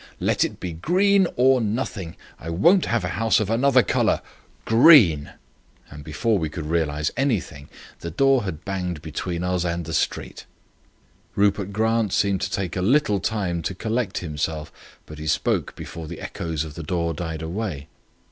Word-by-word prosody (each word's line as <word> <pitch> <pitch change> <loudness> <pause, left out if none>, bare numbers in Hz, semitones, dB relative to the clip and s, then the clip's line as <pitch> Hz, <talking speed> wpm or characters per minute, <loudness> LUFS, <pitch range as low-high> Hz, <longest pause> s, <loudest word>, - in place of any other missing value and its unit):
Let - - +1
it - - -4
be 90 -2 -5
green 190 - +3
or 130 0 +4
nothing. 105 -6 -3 0.2
I 80 - -7
won't 170 - +4
have 115 -4 0
a - - -2
house 115 +3 +2
of 110 -1 -1
another 125 +2 +4
colour. - - +1 0.4
Green!" 115 - +6 0.6
and 75 +1 -10
before 95 +9 0
we 80 -2 -2
could 75 0 -6
realize 75 -2 0
anything 100 - -2 0.3
the 85 - -5
door 135 +9 +3
had 90 -7 -6
banged 90 -5 -3
between 85 +3 -4
us 90 -1 0
and 85 -1 -2
the 80 - -6
street. - - -2 0.9
Rupert 100 -1 +1
Grant 110 0 +1
seemed 100 -2 +1
to - - -1
take 95 -4 -3
a 90 - -1
little 105 -1 +2
time 90 -5 -2
to 95 +3 -4
collect 110 0 -2
himself; 75 0 -3 0.3
but 75 0 -11
he 80 - -6
spoke - - 0
before 80 -2 -8
the 85 +1 -8
echoes 80 -2 -4
of 80 -2 -8
the 85 - -7
door 85 +1 -1
died 80 0 -5
away. 85 -4 -4
90 Hz, 170 wpm, -23 LUFS, 80-115 Hz, 0.9 s, Green